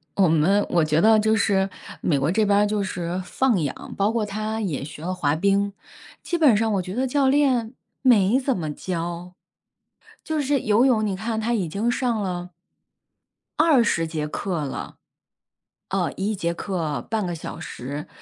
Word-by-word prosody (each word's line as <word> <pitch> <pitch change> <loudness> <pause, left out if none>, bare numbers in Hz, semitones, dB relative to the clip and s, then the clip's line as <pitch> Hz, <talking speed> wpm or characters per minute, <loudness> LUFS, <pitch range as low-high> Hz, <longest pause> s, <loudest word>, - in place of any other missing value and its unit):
我 195 -2 +4
们 165 +6 +3
我 170 -2 +3
觉 155 0 +2
得 220 0 +6
就 220 +1 +2
是 195 -2 +2 0.3
美 145 -5 +1
国 140 +5 +1
这 215 +2 +2
边 200 0 +3
儿 210 - +4
就 205 -1 -1
是 180 -1 -3
放 245 -6 +1
养， 145 -3 -5
包 200 +2 +2
括 225 -2 0
她 215 +2 -3
也 170 -10 -2
学 150 +2 -9
了 185 +2 -2
滑 150 -5 0
冰， 200 +3 +1 0.5
基 345 - -1
本 290 -9 +5
上 220 +1 +1
我 195 - +1
觉 180 +1 -6
得 255 +2 +1
教 275 +1 +2
练 260 -5 +2 0.3
没 235 -2 +4
怎 265 -3 0
么 155 -4 -3
教， 175 +1 -5 0.9
就 315 -1 -2
是 285 0 +1
游 215 +4 +3
泳 230 -5 +3
你 200 -2 -1
看 220 +3 -3
她 235 +2 0
已 200 -7 0
经 200 +8 -1
上 240 -3 0
了 180 -2 -4 1.1
20 235 - +3
节 155 -2 -3
课 170 -1 -3
了。 135 - -6 0.9
呃， - - 0
1 205 +3 -2
节 170 -3 -1
课 170 -5 -3
半 220 -3 0
个 175 - -3
小 160 - -7
时， 140 +5 -6
200 Hz, 190 characters per minute, -23 LUFS, 170-225 Hz, 1.1 s, 得